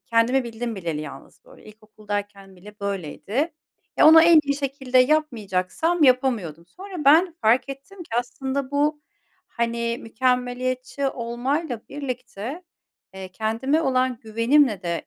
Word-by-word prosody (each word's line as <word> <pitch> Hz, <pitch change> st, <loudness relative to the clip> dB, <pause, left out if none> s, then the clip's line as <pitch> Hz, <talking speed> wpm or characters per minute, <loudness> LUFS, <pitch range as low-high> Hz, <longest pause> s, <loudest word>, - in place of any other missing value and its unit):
kendimi 235 Hz, +3 st, +1 dB
bildim 235 Hz, 0 st, -5 dB
bileli 165 Hz, -5 st, -3 dB
yalnız 155 Hz, -, -11 dB
böyle, -, -, -18 dB
ilkokuldayken 205 Hz, -2 st, -7 dB
bile 205 Hz, +3 st, -15 dB
böyleydi. 200 Hz, -, -3 dB, 0.4 s
Ya, -, -, +6 dB
ona 320 Hz, 0 st, +9 dB
en 335 Hz, -1 st, +7 dB
iyi 280 Hz, 0 st, -1 dB
şekilde 265 Hz, -2 st, 0 dB
yapmayacaksam 255 Hz, -, +1 dB
yapamıyordum. 235 Hz, -, +1 dB
Sonra 370 Hz, -4 st, -8 dB
ben 325 Hz, +5 st, +5 dB
fark 245 Hz, +5 st, +3 dB
ettim 275 Hz, +9 st, -10 dB
ki -, -, -16 dB
aslında 265 Hz, +2 st, -3 dB
bu, 295 Hz, +1 st, 0 dB, 0.5 s
hani, 235 Hz, 0 st, -2 dB
mükemmeliyetçi 255 Hz, +3 st, -1 dB
olmayla 245 Hz, +2 st, -3 dB
birlikte, 255 Hz, -, -6 dB, 0.5 s
eee, 190 Hz, -1 st, -7 dB
kendime 230 Hz, -, 0 dB
olan 255 Hz, -3 st, +1 dB
güvenimle 230 Hz, -1 st, +2 dB
de 170 Hz, -2 st, -3 dB
250 Hz, 125 wpm, -23 LUFS, 215-280 Hz, 0.5 s, ona